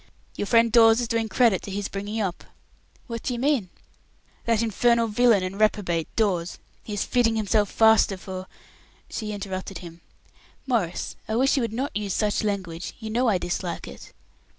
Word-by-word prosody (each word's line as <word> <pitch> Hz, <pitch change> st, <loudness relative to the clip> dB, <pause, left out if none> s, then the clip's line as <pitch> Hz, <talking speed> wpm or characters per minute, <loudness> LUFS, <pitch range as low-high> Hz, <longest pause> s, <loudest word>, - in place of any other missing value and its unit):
"Your 205 Hz, -, -3 dB
friend 230 Hz, 0 st, +4 dB
Dawes 225 Hz, 0 st, +6 dB
is 240 Hz, -, -1 dB
doing 225 Hz, -1 st, -1 dB
credit 225 Hz, -5 st, +3 dB
to -, -, -8 dB
his 200 Hz, 0 st, -3 dB
bringing 205 Hz, +3 st, -4 dB
up." 190 Hz, -4 st, -3 dB, 0.6 s
"What 230 Hz, -2 st, -5 dB
do 250 Hz, -, -2 dB
you -, -, -5 dB
mean?" 260 Hz, -8 st, +1 dB, 0.8 s
"That 230 Hz, -1 st, +2 dB
infernal 235 Hz, +2 st, +2 dB
villain 225 Hz, -2 st, +3 dB
and 190 Hz, +2 st, -5 dB
reprobate, 190 Hz, -6 st, +1 dB
Dawes. 185 Hz, -6 st, 0 dB, 0.2 s
He -, -, -10 dB
is 205 Hz, -, 0 dB
fitting 235 Hz, -3 st, +2 dB
himself 210 Hz, -1 st, +1 dB
faster 220 Hz, -3 st, +4 dB
for 185 Hz, 0 st, -7 dB, 0.3 s
" -, -, -31 dB
She 215 Hz, -2 st, -4 dB
interrupted 195 Hz, -2 st, -5 dB
him. 170 Hz, -1 st, -11 dB, 0.6 s
"Maurice, 220 Hz, -10 st, -1 dB
I 220 Hz, -, -2 dB
wish 265 Hz, +3 st, +3 dB
you 270 Hz, -, +1 dB
would 230 Hz, -, -2 dB
not 260 Hz, +6 st, -3 dB
use 205 Hz, -2 st, -2 dB
such 210 Hz, 0 st, 0 dB
language. 185 Hz, -5 st, -3 dB
You 220 Hz, -1 st, -6 dB
know 245 Hz, +3 st, +1 dB
I 200 Hz, -, +3 dB
dislike 175 Hz, 0 st, -4 dB
it." -, -, -11 dB
215 Hz, 180 wpm, -25 LUFS, 190-230 Hz, 0.8 s, Dawes